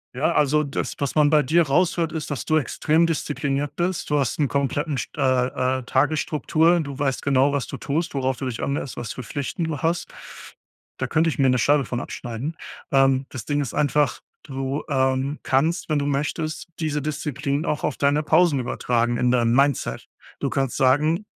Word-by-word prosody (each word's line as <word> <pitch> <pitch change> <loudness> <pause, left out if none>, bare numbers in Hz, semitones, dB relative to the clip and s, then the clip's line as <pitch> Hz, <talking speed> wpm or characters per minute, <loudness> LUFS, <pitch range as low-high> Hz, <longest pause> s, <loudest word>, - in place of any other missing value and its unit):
Ja, 140 +6 +1
also 150 -1 +3
das, 140 -1 -3
was 140 -2 -2
man 150 -1 +4
bei 155 -1 +5
dir 160 +5 +3
raushört 165 +2 +1
ist, 160 -2 -4
dass 145 -4 -4
du 155 - +2
extrem 155 +3 +2
diszipliniert 145 -2 -2
bist. 175 -2 -2
Du 150 - +3
hast 135 +1 -1
'n 145 - +3
kompletten 140 +2 -1
st - - -4
äh, 130 0 +1
äh, - - -9
Tagesstruktur. 155 +4 +2
Du 140 -3 -7
weißt 135 -2 -1
genau, 140 0 +3
was 140 -4 -1
du - - -7
tust, 160 +4 -2
worauf 130 -2 -1
du 135 - -4
dich 125 -3 -4
anlässt, 140 -1 -3
was 115 - -5
für 125 - -7
Pflichten 145 +6 -4
du 160 -3 -3
hast. 170 +3 -1 0.9
Da - - -1
könnte 160 +1 +2
ich - - -7
mir 135 -1 +4
'ne 125 - +3
Scheibe 140 +3 +3
von 120 +1 -3
abschneiden. 125 +8 -5 0.4
Ähm, 135 -1 +3
das 130 -5 -7
Ding 145 -1 0
ist 135 - -4
einfach, 150 -1 +1 0.2
du, 135 0 -3
ähm, 130 +1 0
kannst, 150 +8 +1
wenn 155 - +2
du 140 - -1
möchtest, 150 +3 -2
diese 150 -2 -1
Disziplin 145 0 -2
auch 150 - -2
auf 150 - -1
deine 145 +1 +2
Pausen 155 -2 +3
übertragen 120 -1 0
in 125 0 +2
deinem 120 -2 +2
Mindset. 140 -1 +1 0.3
Du - - -2
kannst 135 -2 -1
sagen, 150 +9 +2
140 Hz, 195 wpm, -23 LUFS, 130-155 Hz, 0.9 s, bei